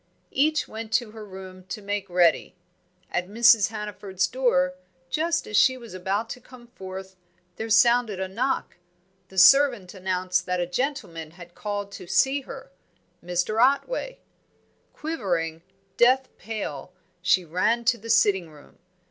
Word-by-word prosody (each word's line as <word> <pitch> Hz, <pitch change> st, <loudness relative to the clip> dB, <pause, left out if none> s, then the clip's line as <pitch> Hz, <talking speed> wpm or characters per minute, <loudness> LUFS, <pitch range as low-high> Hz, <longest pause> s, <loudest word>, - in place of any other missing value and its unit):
Each 305 Hz, +3 st, +1 dB
went 220 Hz, 0 st, -7 dB
to 240 Hz, -4 st, +1 dB
her 220 Hz, 0 st, -10 dB
room 190 Hz, -2 st, -10 dB
to 185 Hz, -, -6 dB
make 205 Hz, -1 st, -4 dB
ready. 175 Hz, -2 st, +2 dB, 0.6 s
At 180 Hz, +1 st, -1 dB
Mrs. 225 Hz, 0 st, +5 dB
Hannaford's 210 Hz, -3 st, -3 dB
door, 180 Hz, -9 st, +1 dB, 0.4 s
just 330 Hz, +2 st, 0 dB
as 210 Hz, -, -5 dB
she 260 Hz, +4 st, +5 dB
was 235 Hz, -4 st, -11 dB
about 195 Hz, +4 st, -2 dB
to 250 Hz, -, -7 dB
come 250 Hz, -1 st, -15 dB
forth, 190 Hz, -4 st, -9 dB, 0.4 s
there 225 Hz, +1 st, -4 dB
sounded 225 Hz, -2 st, +4 dB
a 190 Hz, -, -2 dB
knock; 240 Hz, +8 st, -2 dB, 0.5 s
the 190 Hz, -, -15 dB
servant 240 Hz, -2 st, +6 dB
announced 185 Hz, -1 st, -1 dB
that 180 Hz, 0 st, 0 dB
a 175 Hz, -, 0 dB
gentleman 180 Hz, -, -3 dB
had 175 Hz, +1 st, -14 dB
called 205 Hz, 0 st, -4 dB
to 180 Hz, -, -10 dB
see 270 Hz, +9 st, +2 dB
her 265 Hz, -4 st, -10 dB, 0.5 s
Mr. 180 Hz, +5 st, 0 dB
Otway. -, -, 0 dB, 0.7 s
Quivering, 175 Hz, -, -3 dB, 0.4 s
death 255 Hz, +2 st, +4 dB
pale, 185 Hz, -8 st, -6 dB, 0.3 s
she 180 Hz, 0 st, +3 dB
ran 215 Hz, +8 st, 0 dB
to 240 Hz, 0 st, +2 dB
the 230 Hz, +3 st, -10 dB
sitting 190 Hz, -6 st, +3 dB
room. 150 Hz, -2 st, -18 dB
205 Hz, 145 wpm, -25 LUFS, 185-240 Hz, 0.7 s, servant